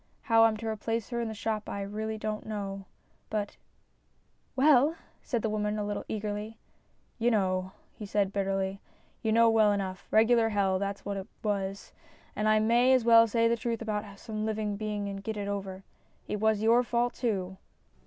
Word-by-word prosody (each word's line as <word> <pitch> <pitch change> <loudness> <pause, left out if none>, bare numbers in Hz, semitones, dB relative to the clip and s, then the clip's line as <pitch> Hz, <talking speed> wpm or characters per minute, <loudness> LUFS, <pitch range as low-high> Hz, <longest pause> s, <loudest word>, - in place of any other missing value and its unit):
How 225 -2 +5
I'm 220 -1 +2
to 225 - -7
replace 225 0 -2
her 240 -1 -2
in 230 - -2
the 220 - -5
shop 215 -1 -3
I 200 - -3
really 215 +2 -4
don't 215 0 -4
know. 195 -2 -5 0.4
But 210 -1 -3 0.3
" - - -42
" - - -42
Well," 285 +2 +5 0.3
said 235 -4 -2
the 220 - +1
woman 210 0 -1
a 210 - -1
little 205 0 -4
eagerly. 210 +1 -4 0.3
" - - -40
You 235 +1 +3
know," 185 -4 0 0.2
he 210 - -8
said 200 -1 0
bitterly, 195 0 -1 0.2
" - - -36
you 220 - 0
know 230 +1 +5
well 220 -2 +5
enough. 190 -2 -3
Regular 225 +1 +4
hell, 195 -3 +1
that's 200 0 -4
what 200 0 -3
it 195 - -6 0.2
was, 200 -2 -3 0.4
and 215 0 +1
I 215 - +5
may 235 +4 +4
as 255 -3 +3
well 230 -1 +7
say 230 +1 +2
the 230 - +2
truth 235 -1 -3
about 215 -2 -2
it - - -11
to 200 0 -12
some 215 0 -5
living 215 -1 -2
being 210 -1 -3
and 195 0 -5
get 220 +1 -4
it 200 -1 -3
over. 195 -1 -4 0.4
It 210 - -3
was 220 0 +2
your 230 +2 +5
fault 240 0 0
too." 190 -6 -2
215 Hz, 205 wpm, -29 LUFS, 200-225 Hz, 0.4 s, well